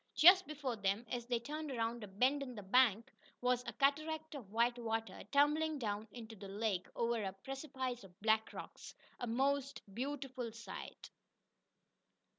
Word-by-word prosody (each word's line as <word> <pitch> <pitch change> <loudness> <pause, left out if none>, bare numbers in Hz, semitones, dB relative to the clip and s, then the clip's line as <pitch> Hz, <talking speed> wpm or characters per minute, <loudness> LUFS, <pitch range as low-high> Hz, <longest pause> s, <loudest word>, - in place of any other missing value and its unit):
Just 370 +3 +9
before 280 -6 -3
them, 200 +3 0
as 240 -1 -2
they 240 -2 +1
turned 300 +5 -5
around 230 -2 -1
a - - -6
bend 255 +9 +2
in 255 -3 -5
the 205 - -7
bank, 230 +2 +4 0.3
was 250 0 +2
a 235 - -3
cataract 310 +4 +1
of 240 -9 -8
white 235 +2 +2
water, 225 -1 -2
tumbling 300 +2 +3
down 215 -3 -2
into 225 -2 -9
the 200 -1 -9
lake 200 -2 -1
over 235 -1 +1
a 195 -2 -2
precipice 260 +3 -4
of 185 -2 -15
black 220 +1 +3
rocks - - -9 0.2
a 245 - -3
most 275 +3 0
beautiful 260 -1 -3
sight. 230 +1 -8
245 Hz, 160 wpm, -37 LUFS, 220-280 Hz, 0.3 s, Just